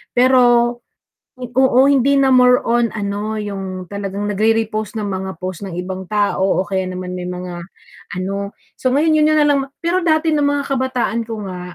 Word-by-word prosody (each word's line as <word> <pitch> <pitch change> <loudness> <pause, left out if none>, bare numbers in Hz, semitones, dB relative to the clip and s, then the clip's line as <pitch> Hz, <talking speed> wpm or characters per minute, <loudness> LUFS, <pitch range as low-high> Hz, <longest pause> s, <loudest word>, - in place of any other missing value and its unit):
Pero 245 -1 +4 0.6
oo, 255 +1 +2
hindi 280 0 +3
na 270 - +3
more 250 0 +6
on 235 -1 +2
ano 210 +1 -3
'yong 190 -3 -5
talagang 200 0 -4
nagre-repost 215 +1 0
ng 210 - -3
mga 190 -1 -4
post 185 0 -6
ng 195 - -6
ibang 185 +1 -5
tao 205 -2 +1 0.2
o 185 - -1
kaya 190 0 -1
naman 180 0 -5
may 180 - -5
mga 180 -1 -6 0.6
ano. 200 +2 -3 0.2
So 255 - -1
ngayon 310 +4 +3
'yon 305 0 +4
'yon 310 - +3
na 300 - +4
lang 290 -1 +3
ma 270 - -8
pero 345 +2 0
dati 315 -1 +2
no'ng 295 - +1
mga 285 0 0
kabataan 255 -3 -1
ko 220 -3 -6
nga, 180 -1 -6
220 Hz, 185 wpm, -18 LUFS, 190-255 Hz, 0.6 s, more